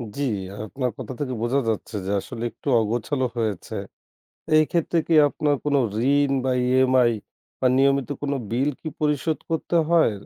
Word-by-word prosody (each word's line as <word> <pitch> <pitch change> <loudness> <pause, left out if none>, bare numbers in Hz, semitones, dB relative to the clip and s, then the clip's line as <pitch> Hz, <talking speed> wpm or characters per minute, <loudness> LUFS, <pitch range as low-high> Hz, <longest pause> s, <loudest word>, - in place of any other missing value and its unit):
জি, 145 - -2 0.4
আপনার 125 +3 -3
কথা - - -6
থেকে 130 -3 -2
বোঝা 125 +4 +1
যাচ্ছে 110 0 -3
যে 100 - -2
আসলে 115 +3 -7
একটু - - -14
অগোছালো 120 +5 -1
হয়েছে। 110 -5 -2 0.8
এই 155 - +7
ক্ষেত্রে 170 0 +1
কি 165 - +3
আপনার 150 0 0
কোনো 145 -1 +2 0.4
ঋণ 145 -1 +2
বা 130 - +1 0.2
EMI 130 -1 +4 0.5
বা 130 - +2
নিয়মিত 135 0 +3
কোন 145 -1 -1 0.2
বিল 130 +5 +1
কি 160 - -5
পরিশোধ 150 +1 0
করতে 165 +1 0
হয়? 165 -10 +4
135 Hz, 160 wpm, -24 LUFS, 120-150 Hz, 0.8 s, এই